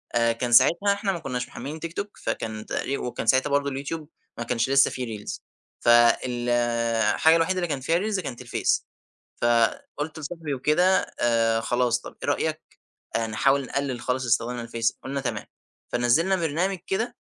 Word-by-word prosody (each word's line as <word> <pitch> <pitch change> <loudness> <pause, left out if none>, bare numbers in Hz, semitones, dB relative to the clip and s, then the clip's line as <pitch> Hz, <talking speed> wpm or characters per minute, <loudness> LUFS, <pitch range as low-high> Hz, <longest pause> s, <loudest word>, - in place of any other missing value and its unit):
آآ، 115 0 +3
كان 120 +1 -3
ساعتها 165 +11 +5
إحنا 200 0 -1
ما 180 - -4
كناش 125 -5 -4
محملين 145 +6 -7
تيك 165 +1 -6
توك، 200 +2 -5
فكان 110 -1 -4
تقريب 140 - -2
وكان 125 - -4
ساعتها 130 +4 +4
برضو 140 0 +1
اليوتيوب 145 +3 -5 0.3
ما 115 - -3
كانش 115 +1 0
لسه 135 0 +5
في 130 - -4
ريلز، 110 -3 -6 0.4
فالحاجة 120 +3 +3
الوحيدة 165 +3 +1
اللي 175 -1 0
كان 145 -4 -2
فيها 165 +6 +2
ريلز 205 +1 -1
كانت 135 -9 -6
الفيس. 120 -2 0 0.6
فقُلت 120 +6 0
لصاحبي 155 0 -5
وكده: 150 +6 +2 0.4
آآ، 115 -1 +2
خلاص 120 0 +1
طب - - -10
إيه - - -1
رأيك - - -1 0.6
آآ 115 - 0
نحاول 135 +6 +2
نقلل 135 -3 -2
خالص 130 +1 -1
استِخدامنا 120 +1 0
للفيس؟ 115 0 -2
قُلنا 140 +1 -3
تمام، 130 - -3 0.5
فنزّلنا 140 +11 +3
برنامج 175 +3 -1
كده 220 +5 -2
130 Hz, 165 wpm, -25 LUFS, 120-160 Hz, 0.6 s, ساعتها